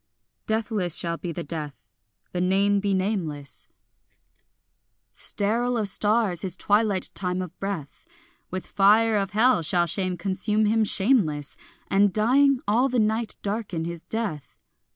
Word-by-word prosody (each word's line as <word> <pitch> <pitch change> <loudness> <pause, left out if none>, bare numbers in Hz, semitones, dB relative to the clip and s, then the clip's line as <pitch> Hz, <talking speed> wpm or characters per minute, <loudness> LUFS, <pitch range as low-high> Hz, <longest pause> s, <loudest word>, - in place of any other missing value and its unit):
Deathless 220 -6 -1
shall 170 -1 -1
be 175 - -5
the 170 +1 -5
death, 150 -2 -6 0.6
the 180 - -2
name 200 +2 +2
be 200 0 -1
nameless; 185 -8 -3 1.5
Sterile 235 +4 +3
of 215 -2 -1
stars 205 -3 +1
his 185 -1 -2
twilight 205 -2 +1
time 180 -1 -2
of 180 -1 -6
breath; 195 -8 -6 0.5
With 185 0 -5
fire 215 +3 +3
of 195 -2 -1
hell 230 -2 +3
shall 175 +2 +1
shame 185 +1 -2
consume 200 +4 -1
him 220 +1 +2
shameless, 190 - +1 0.3
And 200 0 +3
dying, 255 +6 +3
all 240 +6 +2
the 250 - -1
night 220 0 0
darken 200 -6 -3
his 170 -1 -7
death. 210 -11 -5
200 Hz, 135 wpm, -24 LUFS, 175-220 Hz, 1.5 s, Sterile